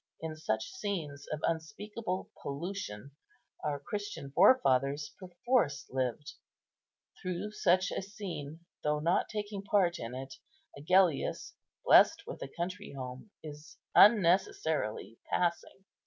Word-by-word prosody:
In 160 -1 -5
such 110 -8 -1
scenes 155 -9 -4
of 155 0 -3
unspeakable 195 +4 -3
pollution, 140 - -5 0.5
our 145 -1 -1
Christian 205 -4 -5
forefathers 145 - +4
perforce 180 - 0
lived; 130 +2 -2 0.9
through 185 +3 -3
such 185 -3 +2
a - - -2
scene, 180 -7 -7 0.2
though 150 0 +1
not 165 +4 +1
taking 205 -2 -4
part 195 -4 +2
in 115 +1 -5
it, 135 +1 -6 0.4
Agellius, 170 +1 +2 0.3
blessed - - +6
with - - -8
a - - -4
country 180 +5 -5
home, 130 +6 -7
is 150 0 -10 0.2
unnecessarily 170 - +3
passing. 180 +2 -1
165 Hz, 110 wpm, -32 LUFS, 140-195 Hz, 0.9 s, blessed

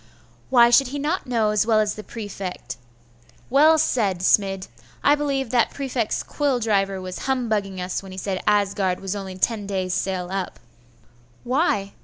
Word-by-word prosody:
'Why 240 -2 +6
should 270 +2 +5
he 280 +3 -5
not 300 +3 -2
know 225 -4 +1
as 210 +1 +1
well 220 -2 +4
as 210 -1 +1
the 215 - -8
prefect? 195 - -7 0.7
Well 305 +4 +6
said, 210 - +1
Smid! 195 -1 +2 0.4
I 290 - +5
believe 275 -4 -1
that 240 -2 +3
prefect's 260 -5 -2
quill 280 -4 0
driver 195 -4 0
was 185 +4 -6
humbugging 215 -7 -1
us 180 0 -3
when 195 -1 -11
he 185 - -9
said 190 -1 -3
Asgard 200 -3 +1
was 195 +1 -4
only 190 -2 -6
ten 205 +1 0
days' 185 -2 -2
sail 185 -2 -2
up.' 195 -1 -3 0.9
'Why? 245 - 0
210 Hz, 165 wpm, -23 LUFS, 190-250 Hz, 0.9 s, Why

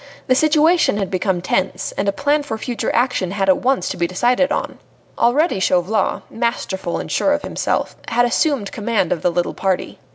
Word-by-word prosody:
The 255 - +3
situation 310 - +3
had 195 -3 -2
become 185 -1 -1
tense, 185 - -1
and 200 - -1
a - - +2
plan 290 +8 +1
for 280 -6 -5
future 240 +1 -3
action 245 -6 +1
had 195 0 -1
at 190 - +5
once 260 -7 +1
to - - -4
be 170 - 0
decided 245 - +1
on. - - -3 0.4
Already 275 - +2
Chauvelin, 185 +3 +1
masterful 210 -6 -2
and - - -6
sure 290 - +2
of 290 - -2
himself, - - -2
had 240 +1 +2
assumed 245 - 0
command 215 -5 -1
of 165 - -1
the 180 - +2
little 175 0 -1
party. 190 -2 -2
225 Hz, 190 wpm, -19 LUFS, 190-270 Hz, 0.4 s, at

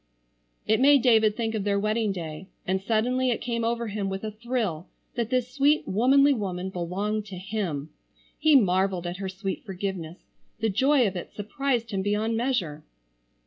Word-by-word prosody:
It 220 0 +2
made 275 -1 +6
David 220 -4 +4
think 225 -2 -1
of 215 -3 -2
their 200 0 +1
wedding 215 +1 0
day, 165 -1 -6 0.2
and 190 +1 0
suddenly 245 +5 +1
it 240 - 0
came 235 -1 -2
over 235 +1 0
him 200 -1 -2
with 195 +1 -4
a 215 - -3
thrill 215 -7 -3 0.3
that 235 -3 -2
this 250 -1 +1
sweet 290 +2 +3
womanly 275 +7 +4
woman 190 -5 -3
belonged 200 +5 -2
to 195 - -7
him. 180 -7 -3 0.5
He 310 -2 +5
marvelled 190 -5 +3
at 175 +1 -4
her 195 0 -4
sweet 190 +1 -4
forgiveness. 190 -4 -5 0.4
The 225 0 +1
joy 265 +5 +3
of 195 -2 -1
it 175 - -6
surprised 235 +2 -2
him 195 -1 -1
beyond 210 +3 0
measure. 205 - -1
210 Hz, 175 wpm, -26 LUFS, 190-235 Hz, 0.5 s, made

